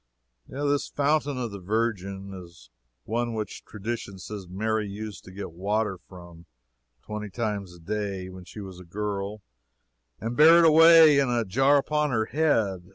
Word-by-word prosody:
This 145 +1 -1
"Fountain 145 -1 0
of 120 -3 -3
the 100 - -7
Virgin" 100 -1 -2
is 85 -3 -13 0.3
the - - -12
one 120 0 -1
which 105 -2 -5
tradition 105 -1 -6
says 95 0 -8
Mary 110 +3 -1
used 105 +1 -7
to 95 - -11
get 100 -1 -7
water 100 +2 -2
from, 85 -2 -13 0.6
twenty 105 -1 -6
times 100 -4 -4
a - - -15
day, 100 +1 -4
when 95 0 -10
she 105 +4 -10
was 95 -2 -9
a - - -10
girl, 100 +2 -4 0.8
and 115 +2 -4
bear 160 +4 +8
it - - +6
away 160 -2 +8
in 135 -2 +2
a 120 -2 0
jar 135 +8 +3
upon 150 +1 0
her 110 -4 0
head. 110 - 0
105 Hz, 165 wpm, -26 LUFS, 95-125 Hz, 0.8 s, bear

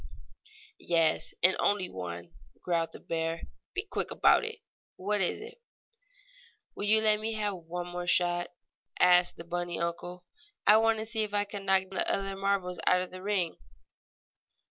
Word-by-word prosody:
"Yes, 165 -2 +1
and 185 +1 +7
only 200 -3 +2
one," 85 - -7 0.3
growled 170 -2 0
the - - -10
bear. 165 0 -3 0.3
"Be - - -1
quick - - -3
about - - +4
it! - - -6 0.3
What 205 +2 -1
is 180 - 0
it?" 470 +2 -11 1.1
"Will 205 - -4
you 220 +1 +5
let 215 -1 +4
me 220 +1 -2
have 210 -2 -1
one 175 0 -6
more 175 0 -5
shot?" 175 -1 +2 0.5
asked 180 0 +5
the - - -7
bunny 175 0 -3
uncle. 175 +1 -4 0.4
"I 210 +1 +8
want 225 0 +3
to 220 - -4
see 225 0 -2
if 210 -1 -2
I 205 - +2
can 200 -1 -7
knock 190 0 +4
the 190 - 0
other 195 0 -2
marbles 195 -3 -1
out 180 0 +4
of 185 - -9
the 185 0 -9
ring." 195 -4 -1
185 Hz, 165 wpm, -30 LUFS, 175-205 Hz, 1.1 s, I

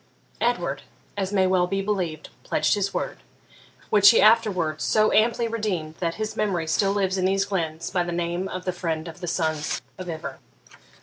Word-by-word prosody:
Edward, - - 0 0.3
as 195 -1 -2
may 190 -2 +3
well 185 -1 +2
be 195 +2 -1
believed, 185 -6 -2
pledged - - +1
his 200 -1 0
word; 185 - -3 0.7
which 200 -1 +8
he 230 - +5
afterwards 200 -8 +3
so 215 0 +3
amply 230 +1 +3
redeemed 205 -9 -2
that 170 -2 -1
his 215 0 -4
memory 190 -6 0
still 195 +5 +1
lives 195 -2 0
in 185 - +1
these 195 +1 +2
glens 170 -4 -3
by 180 -2 +1
the 175 0 -2
name 175 +2 -2
of 185 -1 -6
the 185 - -1
Friend 165 -2 -3
of 165 +1 -9
the 175 - -4
Sons 160 -3 -1 0.2
of 185 -1 -6
Ivor. 160 -1 -6
185 Hz, 185 wpm, -24 LUFS, 170-205 Hz, 0.7 s, which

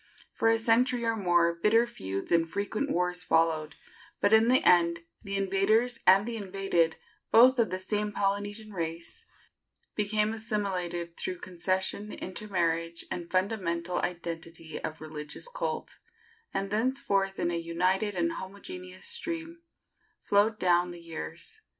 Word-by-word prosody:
For - - +1
a 225 - +4
century 235 +2 +2
or 230 0 +1
more 175 -4 +3
bitter 210 +7 +3
feuds 100 - -5
and 165 -1 +3
frequent 210 - -2
wars 180 -2 0
followed; 160 -2 +1 0.4
but 205 - +3
in 220 +1 +6
the 255 +1 +4
end 170 -1 +4 0.2
the 200 -1 -3
invaders 200 +5 +2
and 195 +2 +7
the 235 -1 -3
invaded, 190 -5 0 0.3
both 250 +3 +7
of 230 - +3
the 185 - -2
same 210 +2 -1
Polynesian 205 +2 -2
race, 170 - -5 0.7
became 210 +1 +1
assimilated 185 -6 -2
through 180 - -1
concession, 190 +4 -2
intermarriage 170 -4 -2
and 170 -1 -4
fundamental 180 -3 0
identity 165 -2 -4
of 155 - -5
religious 155 - -6
cult, - - -4 0.5
and 195 0 -2
thenceforth 210 -4 +1
in 175 - 0
a 170 - -1
united 185 +5 0
and 170 -1 +1
homogeneous 185 -1 -8
stream 335 0 -3 0.6
flowed 210 +2 +3
down 175 -1 +3
the 175 -1 -8
years. 165 - -7
190 Hz, 135 wpm, -29 LUFS, 170-215 Hz, 0.7 s, and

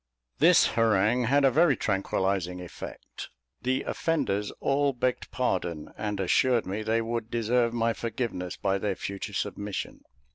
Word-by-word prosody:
This - - +6
harangue 115 +2 +2
had 140 +4 +3
a 135 - +5
very 155 -2 +4
tranquillising 95 -2 -1
effect. 90 -1 -9 0.3
The 130 +2 0
offenders 105 -11 -1
all 140 0 +1
begged 125 0 -1
pardon, 90 -10 -2
and 105 -2 -3
assured 115 +6 +2
me 100 +3 -3
they 115 +1 0
would 115 -1 -3
deserve 120 +1 +1
my 115 0 +1
forgiveness 115 -6 -4
by 100 -1 0
their 100 -1 -1
future 100 +2 -5
submission. 100 0 -4
110 Hz, 140 wpm, -27 LUFS, 100-125 Hz, 0.3 s, This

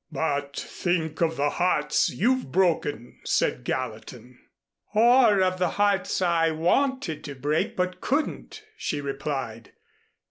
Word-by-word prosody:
"But 145 -2 -2
think 170 -3 -2
of 165 -1 +1
the 145 +1 +1
hearts 180 +1 +1
you've 250 - 0
broken," 155 -8 0
said - - 0
Gallatin. 125 0 -5 0.6
"Or 230 -3 +5
of 185 0 0
the 180 -2 +2
hearts 200 -2 +1
I 165 -2 +2
wanted 175 - 0
to 140 - -7
break 145 +4 -1
but 185 0 -2
couldn't," 310 - -2
she 150 - -3
replied. 135 -5 -5
165 Hz, 120 wpm, -25 LUFS, 140-190 Hz, 0.6 s, Or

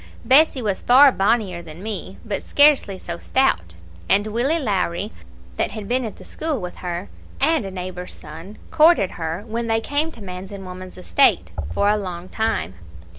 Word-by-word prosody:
Bessie 270 -1 +5
was 200 -3 -1
far 270 +3 +7
bonnier 200 -5 +1
than 165 +2 -11
me, 205 -3 -5
but 210 -3 -3
scarcely 285 -9 +4
so 170 -2 -7
stout; 85 - 0 0.3
and 205 +1 +4
Willie 240 +9 +1
Lowrie, 200 - -1 0.5
that - - +1
had 215 -3 -6
been 250 +2 0
at 220 - -6
the - - -14
school 310 -5 -3
with 180 -2 -7
her, 175 +1 -4 0.3
and 320 -8 +2
a - - -4
neighbour's 180 -1 -6
son, 165 +7 -11
courted 310 - +5
her, 165 +3 -4
when 230 +1 -3
they 225 0 +2
came 290 +7 -1
to 225 - -11
man's 185 0 -7
and 195 -1 -8
woman's 185 0 -9
estate, 180 - +3 0.2
for 200 - +1
a 210 +1 +3
long 180 -3 -6
time. 220 - -1
200 Hz, 180 wpm, -22 LUFS, 180-245 Hz, 0.5 s, far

